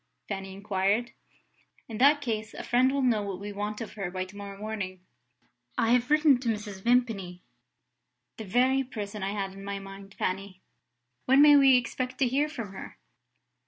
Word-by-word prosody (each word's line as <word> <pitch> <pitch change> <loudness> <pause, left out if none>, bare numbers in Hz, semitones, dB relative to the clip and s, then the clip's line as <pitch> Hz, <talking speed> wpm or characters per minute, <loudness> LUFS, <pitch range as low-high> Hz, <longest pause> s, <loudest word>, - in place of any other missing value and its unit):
Fanny 195 -1 -5
inquired. 200 +3 0 0.8
"In 225 -2 -7
that 290 +3 +5
case, 220 -4 -3
a - - -6
friend 255 +2 +3
will 275 0 0
know 235 -4 +2
what 200 -2 -5
we 205 +1 -6
want 210 +2 -4
of 225 - -6
her 195 -4 -4
by 185 0 -3
to 185 +2 -15
morrow 200 -1 -8
morning. 200 -4 -5 0.8
I 225 0 +2
have 245 0 +3
written 300 -3 +5
to 245 -2 -2
Mrs. 210 -3 -4
Vimpany." 220 -7 0 0.9
"The 220 - -7
very 255 +6 +2
person 210 -4 -6
I 195 +1 -2
had 195 -2 -3
in 195 0 -11
my 200 0 -4
mind, 195 0 -11
Fanny! 185 0 -3 0.7
When 265 +2 +5
may 295 -1 +8
we 270 -2 +7
expect 255 +1 -3
to 265 - +2
hear 280 +5 +1
from 230 -10 -6
her?" - - -9
215 Hz, 180 wpm, -28 LUFS, 195-250 Hz, 0.9 s, may